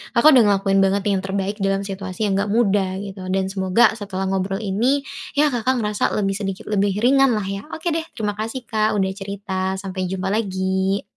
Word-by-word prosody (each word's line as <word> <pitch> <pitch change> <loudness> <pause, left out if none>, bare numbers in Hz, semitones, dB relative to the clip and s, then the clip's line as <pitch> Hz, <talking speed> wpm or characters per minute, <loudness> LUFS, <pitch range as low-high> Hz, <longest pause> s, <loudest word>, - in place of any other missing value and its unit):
Kakak 300 +6 +7
udah 250 -5 +7
ngelakuin 195 -1 +2
banget 195 +1 +2
yang 195 - +1
terbaik 195 +2 -3
dalam 195 0 0
situasi 195 0 -5
yang 195 -2 +1
enggak 205 - 0
mudah 200 -4 +2
gitu, 195 -2 -8
dan 190 0 0
semoga 190 +3 +3
setelah 195 -2 -4
ngobrol 195 +2 -1
ini, 240 +8 +1 0.3
ya 295 0 +3
Kakak 245 +1 0
ngerasa 210 -3 0
lebih 195 -2 0
sedikit 195 -2 -4
lebih 200 -1 +1
ringan 270 -1 +5
lah 210 - -1
ya. 195 +5 -5
Oke 335 +2 -2
deh 325 0 -1
terima 210 -4 -1
kasih 225 +5 -5
Kak 215 -2 0
udah 190 -1 +1
cerita, 190 -1 -3
sampai 190 -1 -4
jumpa 190 +1 -2
lagi. 190 -2 0
195 Hz, 195 wpm, -21 LUFS, 190-215 Hz, 0.3 s, Kakak